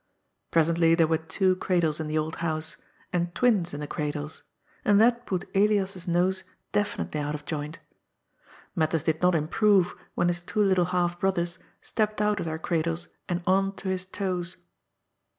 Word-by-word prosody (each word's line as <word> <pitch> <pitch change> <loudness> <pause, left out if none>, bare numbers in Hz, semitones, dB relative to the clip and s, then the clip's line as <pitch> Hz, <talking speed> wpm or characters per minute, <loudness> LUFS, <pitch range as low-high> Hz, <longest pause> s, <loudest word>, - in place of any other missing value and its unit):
Presently 165 0 +4
there 165 -1 +4
were 160 0 +1
two 185 +3 +1
cradles 170 -5 +1
in 160 - -3
the 155 +1 -1
old 155 +1 -2
house, 155 -1 -2 0.4
and 175 0 -1
twins 205 -9 +3
in 145 - -5
the - - -3
cradles, 150 +1 -4 0.4
and 205 -1 +5
that 240 +2 +3
put 185 -1 -2
Elias's 195 -2 +2
nose 180 +2 +1 0.3
definitely 205 -6 -1
out 145 +1 -2
of 150 0 -8
joint. 150 +1 -4 1.0
Matters 160 -2 +1
did 160 -1 0
not 180 0 +4
improve 185 +4 +3 0.2
when 175 - +2
his 175 0 -1
two 210 +4 0
little 190 -3 +3
half 175 0 0
brothers 175 -2 0 0.2
stepped 215 -1 -1
out 210 -1 +2
of - - -3
their 160 0 -2
cradles 165 +1 -1 0.2
and 175 0 -1
on 195 +1 +2
to 190 - -4
his 185 0 -2
toes. 185 -2 -3
175 Hz, 170 wpm, -27 LUFS, 160-190 Hz, 1.0 s, and